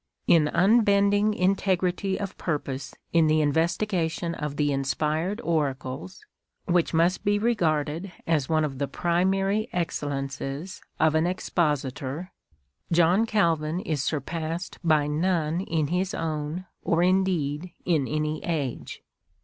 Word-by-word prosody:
In 160 Hz, -3 st, +5 dB
unbending 205 Hz, +2 st, +3 dB
integrity 190 Hz, 0 st, +1 dB
of 200 Hz, -2 st, -4 dB
purpose 140 Hz, -4 st, -4 dB, 0.2 s
in 165 Hz, -2 st, +5 dB
the 155 Hz, 0 st, +3 dB
investigation 165 Hz, +2 st, 0 dB
of 150 Hz, -3 st, -4 dB
the 145 Hz, -1 st, +1 dB
Inspired 155 Hz, -, -1 dB
Oracles 145 Hz, 0 st, -3 dB, 0.2 s
— -, -, -58 dB
which 175 Hz, -2 st, +2 dB
must 170 Hz, +3 st, +2 dB
be 205 Hz, 0 st, +2 dB
regarded 170 Hz, -6 st, 0 dB
as 155 Hz, -5 st, +1 dB
one 155 Hz, -1 st, +2 dB
of 135 Hz, -3 st, -5 dB
the 140 Hz, -, 0 dB
primary 195 Hz, -, +1 dB
excellences 145 Hz, +1 st, -3 dB, 0.2 s
of 160 Hz, -1 st, +4 dB
an 160 Hz, +2 st, +2 dB
Expositor 150 Hz, -2 st, -2 dB, 0.3 s
— 65 Hz, -, -44 dB
John 175 Hz, +6 st, +4 dB
Calvin 165 Hz, -6 st, +1 dB
is 155 Hz, -6 st, -2 dB
surpassed 165 Hz, +4 st, -3 dB
by 155 Hz, -3 st, +3 dB
none 165 Hz, +2 st, 0 dB
in 160 Hz, -5 st, 0 dB
his 185 Hz, +3 st, -1 dB
own, 155 Hz, +2 st, -3 dB, 0.2 s
or 170 Hz, +1 st, +1 dB
indeed 180 Hz, -4 st, +1 dB
in 155 Hz, -7 st, +2 dB
any 155 Hz, 0 st, -2 dB
age. 145 Hz, -7 st, -3 dB
165 Hz, 125 wpm, -26 LUFS, 150-185 Hz, 0.3 s, In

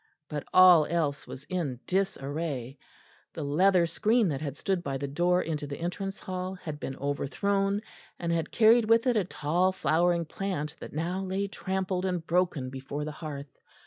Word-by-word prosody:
But 150 Hz, -2 st, -4 dB
all 180 Hz, -4 st, +8 dB
else 150 Hz, -4 st, -1 dB
was 135 Hz, -, -8 dB
in 150 Hz, -7 st, -3 dB
disarray. 145 Hz, -8 st, -2 dB, 0.6 s
The -, -, -4 dB
leather 175 Hz, +5 st, +4 dB
screen 215 Hz, +5 st, +2 dB
that 140 Hz, -2 st, -3 dB
had 145 Hz, -2 st, -4 dB
stood 190 Hz, -2 st, -1 dB
by 135 Hz, -4 st, -3 dB
the 140 Hz, +1 st, -3 dB
door 175 Hz, +5 st, +2 dB
into 150 Hz, -2 st, -3 dB
the 140 Hz, -, -5 dB
entrance 195 Hz, +3 st, -4 dB
hall 185 Hz, 0 st, -4 dB
had 155 Hz, -5 st, -7 dB
been 135 Hz, -, -5 dB
overthrown, 195 Hz, +9 st, 0 dB, 0.4 s
and 170 Hz, -1 st, -2 dB
had 165 Hz, -2 st, 0 dB
carried 230 Hz, +1 st, +5 dB
with 230 Hz, +1 st, +5 dB
it 250 Hz, -2 st, +3 dB
a 210 Hz, -4 st, +2 dB
tall 175 Hz, +3 st, +1 dB
flowering 170 Hz, -1 st, +2 dB
plant 160 Hz, -3 st, -3 dB
that -, -, -8 dB
now 170 Hz, +5 st, -2 dB
lay 190 Hz, +1 st, -1 dB
trampled 190 Hz, -1 st, -2 dB
and 180 Hz, -3 st, -2 dB
broken 170 Hz, -7 st, 0 dB
before 135 Hz, +2 st, -5 dB
the 155 Hz, -, -4 dB
hearth. 150 Hz, -3 st, -7 dB
170 Hz, 175 wpm, -28 LUFS, 145-190 Hz, 0.6 s, all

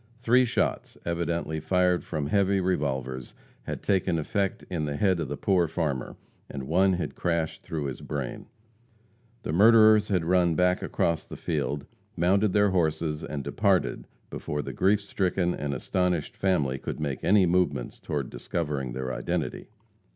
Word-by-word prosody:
Three 125 Hz, +2 st, +4 dB
shots, 115 Hz, -, -1 dB
evidently 85 Hz, -2 st, -2 dB
fired 90 Hz, +2 st, +2 dB
from 75 Hz, -3 st, -3 dB
heavy 100 Hz, +4 st, +2 dB
revolvers, 65 Hz, -8 st, -2 dB, 0.3 s
had -, -, -5 dB
taken 95 Hz, -3 st, +1 dB
effect 95 Hz, +5 st, -2 dB
in 85 Hz, -4 st, -2 dB
the 75 Hz, -1 st, -3 dB
head 95 Hz, +2 st, +2 dB
of 80 Hz, -, -2 dB
the -, -, -4 dB
poor 90 Hz, -3 st, +2 dB
farmer, 75 Hz, -6 st, -2 dB, 0.3 s
and 70 Hz, -, -6 dB
one 95 Hz, +4 st, +3 dB
had 90 Hz, -1 st, -3 dB
crashed 85 Hz, -2 st, -1 dB
through 80 Hz, -2 st, -4 dB
his 70 Hz, -3 st, -5 dB
brain. 70 Hz, -4 st, -5 dB, 1.0 s
The -, -, -3 dB
murderers 110 Hz, +2 st, +6 dB
had 90 Hz, -5 st, 0 dB
run 90 Hz, -1 st, +3 dB
back 90 Hz, +1 st, +2 dB
across 85 Hz, -2 st, -1 dB
the -, -, -8 dB
field, 70 Hz, -1 st, -2 dB, 0.3 s
mounted 95 Hz, +4 st, +3 dB
their 105 Hz, 0 st, +3 dB
horses 80 Hz, -3 st, 0 dB
and 70 Hz, -2 st, -4 dB
departed -, -, 0 dB, 0.2 s
before 75 Hz, 0 st, -3 dB
the -, -, -6 dB
grief 100 Hz, +2 st, +2 dB
stricken 95 Hz, -3 st, 0 dB
and 75 Hz, -1 st, -3 dB
astonished 90 Hz, +4 st, -1 dB
family 75 Hz, -9 st, 0 dB
could -, -, -5 dB
make 70 Hz, -4 st, -3 dB
any 100 Hz, -1 st, +5 dB
movements 85 Hz, -8 st, 0 dB
toward 70 Hz, -4 st, -3 dB
discovering 75 Hz, -7 st, -3 dB
their 65 Hz, 0 st, -3 dB
identity. 80 Hz, +7 st, -3 dB
85 Hz, 155 wpm, -27 LUFS, 75-95 Hz, 1.0 s, murderers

